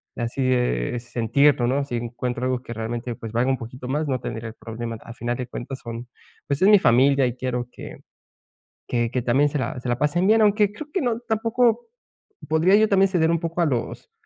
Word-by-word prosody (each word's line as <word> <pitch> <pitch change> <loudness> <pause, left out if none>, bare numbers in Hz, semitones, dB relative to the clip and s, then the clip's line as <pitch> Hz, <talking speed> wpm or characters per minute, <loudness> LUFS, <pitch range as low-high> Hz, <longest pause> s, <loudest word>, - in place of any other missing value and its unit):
de 120 - -3
así, 120 +3 -3
eh, 125 - 0
sentirlo, 120 +3 +2
¿no? 135 +3 +1
Si 125 - -4
encuentro 120 +1 -3
algo 130 -1 -1
que 120 - -8
realmente, 115 +1 -4
pues 115 -1 -8
valga 120 +3 +1
un 135 - +1
poquito 125 +2 -8
más, 150 +3 -1
no 130 -2 -1
tendría 115 -1 -5
el 110 - -12
problema. 115 0 -6
Al 115 - -11
final 120 +1 -3
de 125 - -4
cuentas 130 +2 -7
son 115 +1 -7 0.4
Pues 140 -1 -1
es 190 - +6
mi 210 0 +8
familia, 135 -1 +4
y 125 -1 -2
quiero 125 -1 -3
que - - -10 0.9
que 120 -2 0
que 130 - -1
también 135 +5 +3
se 150 - -2
la 130 - -3
se 125 - -4
la 120 - +1
pasen 170 +5 +1
bien. 220 +1 +5
Aunque 210 -1 +3
creo 290 +8 -9
que 380 - 0
no 240 -4 0
Tampoco 230 - +1 0.6
podría 160 +5 +4
yo 215 +1 +5
también, 195 -1 +4
ceder 165 -4 +2
un 170 - +1
poco 165 +1 -2
a 170 - +4
los, 125 - -3
130 Hz, 225 wpm, -23 LUFS, 120-170 Hz, 0.9 s, mi